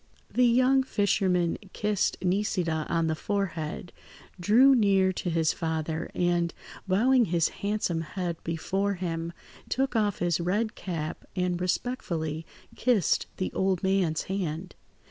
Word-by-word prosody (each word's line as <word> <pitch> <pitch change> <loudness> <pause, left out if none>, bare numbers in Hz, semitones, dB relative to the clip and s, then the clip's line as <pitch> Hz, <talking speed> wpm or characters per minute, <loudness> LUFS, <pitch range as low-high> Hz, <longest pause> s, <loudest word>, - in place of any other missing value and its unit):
The 250 0 +4
young 255 +3 +4
fisherman 190 -7 +1
kissed 210 -2 0
Nisida 180 -4 0
on 165 -1 +1
the 160 - +1
forehead, 175 -2 -3 0.5
drew 235 +9 +6
near 195 -5 +3
to 175 - -3
his 165 -1 +2
father, 160 0 -2
and, 175 -1 +1 0.3
bowing 240 +6 +4
his 170 -3 +1
handsome 200 -5 -1
head 170 +1 -4
before 195 +5 -1
him, 170 -2 -3 0.4
took 270 0 0
off 210 -3 +1
his 175 -1 0
red 210 +6 0
cap 160 -4 -5
and 180 -1 0
respectfully 170 -6 -2 0.3
kissed 230 - +2
the 185 - -2
old 190 -1 0
man's 190 -5 +1
hand. 180 -2 -3
180 Hz, 125 wpm, -28 LUFS, 165-205 Hz, 0.5 s, drew